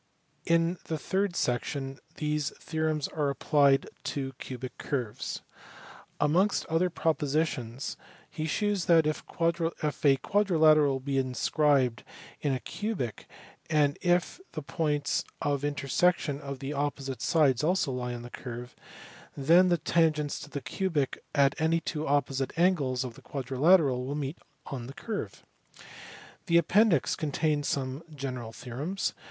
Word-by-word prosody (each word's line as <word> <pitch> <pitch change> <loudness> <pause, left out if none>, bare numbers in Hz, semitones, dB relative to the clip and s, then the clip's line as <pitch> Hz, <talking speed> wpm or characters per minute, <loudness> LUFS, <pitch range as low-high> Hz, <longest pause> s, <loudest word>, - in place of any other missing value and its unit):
In 170 +1 +2
the 160 - -2
third 190 +3 -1
section 135 +1 -2 0.2
these 150 -1 -1
theorems 155 -2 -1
are 150 -3 0
applied 140 -1 +3 0.2
to 135 -2 -3
cubic 130 0 -6
curves. 125 -7 -3 0.8
Amongst 175 +8 +2
other 165 +3 +1
propositions 145 -6 -1 0.3
he 155 - -4
here - - -3
shews 205 -2 0
that, 165 -2 +5
if 155 0 -1 0.8
a 140 -2 +6
quadri 200 +2 +1
lateral 155 -3 +5
be 135 0 -1
inscribed 130 -1 +2 0.4
in 145 - +1
a 130 - 0
cubic, 195 - -4 0.4
and 145 -2 +2
if 175 - +1
the 155 - -5
points 150 -2 0 0.2
of 145 -1 -1
intersection 145 +1 +1
of 140 -1 -5
the 135 +3 -4
opposite 140 -3 -3
sides 150 -6 +3
also 175 -3 +2
lie 125 -1 -3
on 120 - -7
the 120 - -10
curve, 120 0 -7 0.6
then 170 +6 +5
the 175 - +3
tangents 155 -2 +1
to 145 - -9
the 145 - -5
cubic 145 +1 -1
at 140 -1 +4
any 165 +1 +3
two 155 -2 -3
opposite 135 0 0
angles 145 -8 +2
of 125 -2 -6
the - - -15
quadrilateral 135 0 +2
will 135 +3 -3
meet 145 +2 -4 0.3
on 125 -4 -6
the 135 - -9
curve. 220 -3 -5 1.0
The 170 -1 +5
appendix 175 - +4
contains 150 0 0
some 135 +1 -2
general 130 -5 -5
theorems. 135 - -3
145 Hz, 135 wpm, -29 LUFS, 135-165 Hz, 1.0 s, a